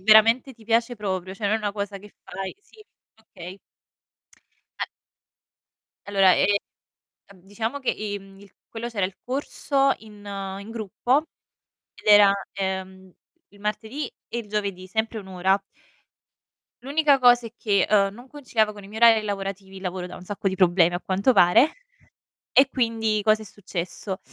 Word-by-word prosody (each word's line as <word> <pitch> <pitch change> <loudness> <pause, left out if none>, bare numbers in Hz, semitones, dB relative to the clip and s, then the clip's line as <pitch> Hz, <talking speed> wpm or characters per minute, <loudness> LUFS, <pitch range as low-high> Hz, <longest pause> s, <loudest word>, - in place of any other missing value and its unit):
veramente 225 +6 +5
ti 230 -2 -19
piace 230 +2 +1
proprio, 190 -3 -3
cioè 205 - -8
non 205 - +2
è - - +3
una 210 -2 -2
cosa 200 -1 -4
che 205 +1 -13
fai 190 +1 -6
sì, 430 +1 -19 0.3
okay. 185 -4 -11 1.3
A - - +1 1.2
Allora 195 -2 +5
è - - +3 0.9
ehm, 190 - -17
diciamo 220 +8 -4
che 260 - 0
i 205 -1 -4
mhmm, 195 0 -16
i 200 -1 -16 0.2
quello 230 +1 -5
c'era 205 -6 -1
il 190 0 -12
corso 275 +1 0
in 210 -2 -15 0.4
in 205 +2 -10
gruppo, 225 +5 0 0.7
ed - - -18
era, 205 -1 +8 0.2
ehm, 190 -1 -4 0.4
il 205 - -20
martedì 220 +7 -3 0.2
e 235 - -4
il 225 -3 -7
giovedì, 200 -3 -3
sempre 220 +3 -2
1 200 - -9
ora. 190 +1 +2 1.3
L'unica 285 +1 +3
cosa 245 -2 +5
è 225 - -16
che, 200 -5 +1
uhm, 195 -1 +3
non 245 +4 -13
conciliavo 240 -7 -1
con 205 -1 -12
i 195 - -12
miei 220 +1 -7
orari 230 -2 +7
lavorativi- 195 -1 -5
il - - -11
lavoro 180 -1 -4
da 180 - -9
un 180 - -13
sacco 200 0 -2
di 190 - -3
problemi 175 -2 +4
a 175 - -1
quanto 195 +7 +1
pare- 230 - +5 0.8
e 270 0 +6
quindi 225 -4 0
cosa 215 0 +3
è - - -9
successo: 190 0 -6
205 Hz, 165 wpm, -24 LUFS, 195-230 Hz, 1.3 s, era